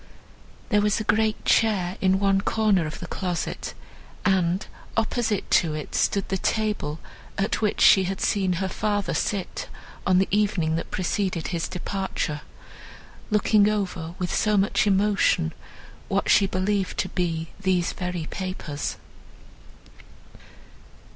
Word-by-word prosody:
There 210 -3 +3
was 210 +1 +2
a - - -2
great 215 +1 +1
chair 195 -5 +2
in 190 0 +3
one 195 -1 +3
corner 205 -7 +2
of 155 - -7
the - - -6
closet, 180 -3 -3 0.5
and, 185 -1 +2 0.3
opposite 225 -2 0
to 160 -3 -3
it, 150 - -6
stood 200 - +1
the 190 - -1
table, 210 -9 -1 0.4
at 200 +2 0
which 210 -2 0
she 190 -1 +7
had 190 +1 -3
seen 190 -3 +1
her 190 +2 -1
father 205 +1 -1
sit, 200 -3 -2 0.4
on 185 -1 +4
the 190 - +3
evening 195 -6 +1
that 165 - -3
preceded 185 -2 -1
his 170 -2 -2
departure, 185 -5 -3 0.9
looking 210 -1 +4
over, 180 -5 -3
with 180 -1 -2
so 210 -1 +2
much 200 +2 +2
emotion, 195 - +2 0.5
what - - +1
she 195 - +5
believed 190 +1 -1
to 185 - -1
be 165 -3 -2
these 185 -3 +1
very 180 -3 -4
papers. 175 -6 -4
190 Hz, 135 wpm, -25 LUFS, 180-205 Hz, 0.9 s, she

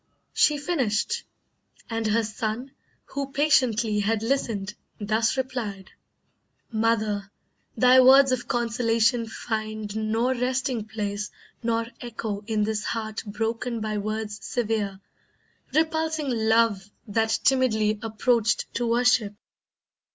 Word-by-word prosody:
She 300 - +4
finished, 290 - -1 0.6
and 225 -1 -2
her 225 +2 +2
son, 220 +4 -4 0.4
Who 275 -1 -4
patiently 240 -7 +2
had 215 +1 0
listened, 225 -6 -1 0.3
thus 220 +4 +1
replied: 235 -7 -4 0.8
"Mother, 215 -3 0 0.5
thy 255 +1 +6
words 265 +1 +7
of 255 -1 -1
consolation 230 0 +1
find 215 -2 -4
Nor 220 +4 +1
resting 255 -2 -1
place, 210 -1 -3 0.3
nor 230 -1 0
echo 225 -4 -5
in 215 -2 +1
this 215 0 -1
heart 220 -1 -3
Broken 225 +3 -2
by 215 -1 -2
words 215 0 -4
severe, 210 -5 -2 0.7
repulsing 315 -2 0
Love 220 -3 +2 0.2
That 220 +1 +1
timidly 220 -5 +2
approached 225 +1 +1
to 240 - -1
worship. 235 -3 +2
225 Hz, 105 wpm, -25 LUFS, 215-250 Hz, 0.8 s, words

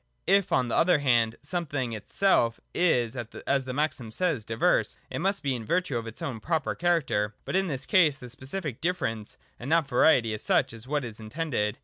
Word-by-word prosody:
If, 195 0 +3
on 125 -1 +2
the - - -1
other 180 -1 +4
hand, 120 -5 +2
the - - -18
something 145 -7 -2
itself 115 - +1
is 125 -10 +2
as 130 +3 -2
the 130 - -4
maxim 145 -4 -1
says 150 -1 -1
diverse, 115 +1 +1
it - - -3
must 195 +3 0
be 140 -2 +1
in 120 -3 -4
virtue 180 +4 0
of 115 -1 -3
its 115 - -7
own 125 -5 -4
proper 160 +5 -1
character: 140 -12 0
but - - -3
in 190 0 +2
this 140 -5 -3
case 165 -8 +4
the 125 - -10
specific 135 +1 -3
difference, 145 -12 -2 0.2
and 125 - -6
not 165 -2 +3
variety 125 -3 +4
as 105 - -5
such, - - +2
is 115 +2 -9
what 145 -1 -1
is 115 -2 -7
intended. 110 -3 -2
135 Hz, 205 wpm, -27 LUFS, 115-165 Hz, 0.2 s, other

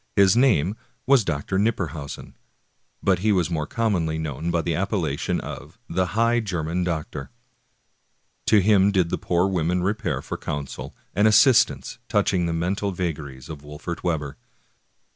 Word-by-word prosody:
His 100 +1 +5
name 105 - +3 0.3
was 130 -3 +5
Dr. 85 +2 -1
Knipperhausen, 90 -9 -2 0.7
but 95 -3 +3
he 105 +3 +2
was 90 -3 +1
more 75 -3 -1
commonly 90 -9 0
known 80 +1 -3
by 85 -1 0
the 85 - -1
appellation 85 -5 -1
of - - -8
the 95 -1 0
" 100 - -7
High 115 +1 +3
German 90 -4 -2
Doctor." 80 -5 -4 1.1
^ - - -45
To 105 - +6
him 100 0 +4
did 90 -4 +1
the - - -1
poor 90 +2 +1
women 90 -1 0
repair 95 - -1
for - - -5
counsel 70 -2 -5 0.2
and 105 +2 +4
assist 120 +3 +6
ance - - -9
touching 90 -3 +2
the - - -1
mental 95 +4 -1
vagaries 75 -7 -5
of 75 -3 -8
Wolfert 75 +4 -7
Webber. 75 -5 -2
90 Hz, 160 wpm, -24 LUFS, 80-100 Hz, 1.1 s, To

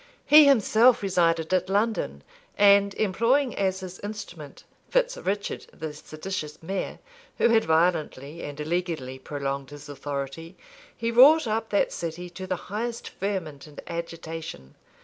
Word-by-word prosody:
He 300 0 +8
himself 235 -2 +5
resided 165 -3 +1
at 185 0 +1
London; 200 - -1 0.3
and 200 -1 +5
employing 235 +6 +1
as 190 -1 -1
his 185 -1 -8
instrument 200 -8 -8 0.3
Fitz - - +1
Richard, 200 +1 -3
the 160 -2 -6
seditious 155 +1 -7
mayor, 190 +3 -3 0.4
who - - +4
had 225 -1 +4
violently 160 -2 0
and 145 0 -7
illegally 155 -5 -3
prolonged 140 -1 -4
his 145 0 -11
authority, 145 +3 -6 0.4
he 230 0 -1
wrought 280 +7 +7
up 225 0 -2
that 205 - +1
city 170 +1 -5
to 185 +2 -7
the 185 - -1
highest 230 +6 -5
ferment 170 -8 -4
and 150 - -12
agitation. 165 - -7
180 Hz, 135 wpm, -26 LUFS, 155-205 Hz, 0.4 s, He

